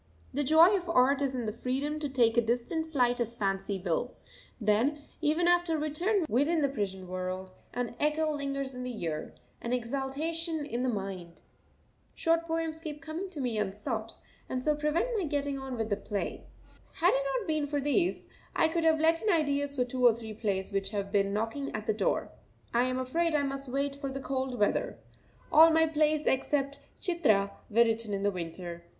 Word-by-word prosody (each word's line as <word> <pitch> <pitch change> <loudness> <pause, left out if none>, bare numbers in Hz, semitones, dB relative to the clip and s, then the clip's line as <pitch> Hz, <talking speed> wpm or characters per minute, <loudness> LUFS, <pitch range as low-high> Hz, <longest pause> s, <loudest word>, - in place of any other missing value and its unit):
The 290 +3 0
joy 320 +7 +7
of 355 -3 -3
art 275 -2 +4
is 270 -2 0
in 240 -3 -2
freedom 275 +6 -2
to 295 -2 -3
take 240 -4 +3
a 235 - +5
distant 245 +8 -1
flight 245 -4 +2
as 235 0 -2
fancy 195 -1 -1
will; 180 +7 -2 0.4
then, 235 +7 +1 0.2
even 320 +3 +2
after 350 -2 +3
return 335 +6 0
within 295 +5 +2
the 280 - +3
prison 190 -7 -3
world, 185 +1 -4 0.2
an 245 -1 -2
echo 305 +1 +1
lingers 275 -2 -3
in 250 - -6
the 250 -3 -5
ear, 155 -2 -4 0.3
an 235 - -2
exaltation 290 +6 -1
in 245 -4 -3
the 255 - +1
mind. 190 -6 -5 0.7
Short 330 0 +1
poems 325 -1 -2
keep 305 -2 -6
coming 315 +7 -5
to 335 -5 -7
me 240 -5 -1
unsought, 215 +3 -3 0.3
and 255 0 -3
so 305 - +4
prevent 300 +9 0
my 375 - -1
getting 285 -2 -1
on 265 -2 -5
with 225 -1 -2
the 205 - +2
play. 205 0 -4 0.5
Had - - +3
it - - +1
not 445 -5 -4
been 310 -2 0
for 290 0 -1
these, 290 +6 +1 0.3
I - - +4
could 335 0 0
have 320 -1 +4
let 325 +1 +3
in 440 - 0
ideas 285 -4 +1
for 250 -2 +1
two 250 +1 -3
or 240 -2 +7
three 225 -2 -7
plays 205 -3 -2
which 195 -1 -1
have 200 -2 -3
been 200 -1 +2
knocking 225 +7 -2
at 215 0 -4
the 220 - +1
door. 215 - 0 0.4
I 240 +1 +3
am 255 0 -1
afraid 315 +6 0
I 290 - +2
must 275 -1 -4
wait 275 +2 -1
for 275 -1 -4
the 275 - -4
cold 265 -1 -2
weather. 205 - +1 0.5
All 320 +2 +9
my 320 0 +4
plays 310 -1 +2
except 275 +1 +1 0.2
"Chitra" 220 - +2 0.2
were 230 +3 +5
written 225 -2 -1
in 195 - -3
the 205 - +2
winter. 170 -1 -6
270 Hz, 195 wpm, -30 LUFS, 220-310 Hz, 0.7 s, All